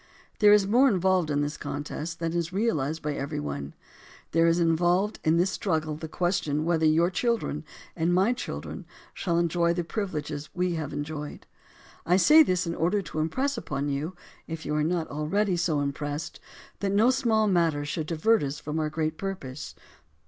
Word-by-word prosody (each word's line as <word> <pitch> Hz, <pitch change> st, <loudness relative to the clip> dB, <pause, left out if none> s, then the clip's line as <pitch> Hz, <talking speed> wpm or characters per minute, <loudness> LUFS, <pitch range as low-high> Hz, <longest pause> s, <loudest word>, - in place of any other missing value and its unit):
There 210 Hz, -1 st, +7 dB
is 205 Hz, -1 st, +6 dB
more 245 Hz, +7 st, +5 dB
involved 185 Hz, -, +2 dB
in 145 Hz, -1 st, +1 dB
this 145 Hz, +1 st, -2 dB
contest 150 Hz, +3 st, -5 dB
than 165 Hz, 0 st, -2 dB
is 170 Hz, 0 st, -1 dB
realized 160 Hz, -8 st, -1 dB
by 150 Hz, 0 st, -1 dB
every 140 Hz, 0 st, -3 dB
one. 70 Hz, -1 st, -5 dB, 0.6 s
There 165 Hz, +1 st, +4 dB
is 165 Hz, +1 st, +3 dB
involved 175 Hz, +5 st, +2 dB
in 160 Hz, +1 st, +3 dB
this 180 Hz, +3 st, +2 dB
struggle 155 Hz, -7 st, -1 dB
the 160 Hz, +1 st, -6 dB
question 160 Hz, -3 st, -1 dB
whether 165 Hz, -2 st, +2 dB
your 165 Hz, +3 st, +3 dB
children 230 Hz, -9 st, -1 dB, 0.3 s
and 165 Hz, +1 st, +1 dB
my 190 Hz, +7 st, +3 dB
children 250 Hz, -, -6 dB, 0.3 s
shall 170 Hz, -3 st, -1 dB
enjoy 170 Hz, 0 st, +2 dB
the 175 Hz, -, -1 dB
privileges 155 Hz, -6 st, -4 dB
we 180 Hz, 0 st, 0 dB
have 155 Hz, -3 st, -3 dB
enjoyed. 150 Hz, 0 st, -5 dB, 0.6 s
I 180 Hz, +2 st, +3 dB
say 305 Hz, -, +7 dB
this 185 Hz, -, +2 dB
in 170 Hz, -, -2 dB
order 180 Hz, +5 st, 0 dB
to 155 Hz, -, -5 dB
impress 260 Hz, -, 0 dB
upon 140 Hz, 0 st, -3 dB
you, 150 Hz, +6 st, -3 dB, 0.3 s
if 160 Hz, -1 st, -6 dB
you -, -, -2 dB
are 150 Hz, 0 st, +1 dB
not 165 Hz, 0 st, 0 dB
already 180 Hz, +7 st, 0 dB
so 165 Hz, -4 st, +1 dB
impressed, 145 Hz, +2 st, -4 dB, 0.4 s
that 200 Hz, -1 st, -1 dB
no 215 Hz, +5 st, +4 dB
small 230 Hz, -5 st, +2 dB
matter 165 Hz, -6 st, +2 dB
should 155 Hz, +1 st, -3 dB
divert 205 Hz, +8 st, +2 dB
us 140 Hz, +1 st, -3 dB
from 150 Hz, +2 st, -3 dB
our 155 Hz, -1 st, 0 dB
great 155 Hz, 0 st, -2 dB
purpose. 165 Hz, -9 st, -5 dB
165 Hz, 180 wpm, -27 LUFS, 150-190 Hz, 0.6 s, There